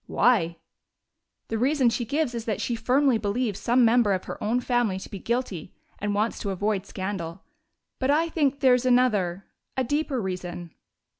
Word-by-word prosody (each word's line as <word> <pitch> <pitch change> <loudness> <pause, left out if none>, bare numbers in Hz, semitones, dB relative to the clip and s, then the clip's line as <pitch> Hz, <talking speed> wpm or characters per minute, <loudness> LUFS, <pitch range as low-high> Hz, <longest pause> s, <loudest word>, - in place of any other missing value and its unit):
"Why?" 195 -8 +2 0.9
"The 225 - -1
reason 260 -1 +3
she 240 - -2
gives 280 +1 -1
is 230 -1 -4
that 215 -3 -2
she 240 - -1
firmly 250 +2 +2
believes 210 0 -1
some 245 +1 +3
member 230 -3 +4
of 185 - -2
her - - -7
own 230 +4 +1
family 240 -6 0
to 190 - -8
be 200 - -6
guilty 225 -7 -3 0.2
and 205 0 -1
wants 215 +3 0
to 200 - -3
avoid 200 +1 -1
scandal. 185 -2 -5 0.6
But 260 - 0
I 315 +3 +3
think 285 -4 0
there's 250 -2 +4
another 205 -8 +2 0.3
a 260 - +2
deeper 290 +1 -1
reason." 180 -4 -5
230 Hz, 170 wpm, -26 LUFS, 195-255 Hz, 0.9 s, member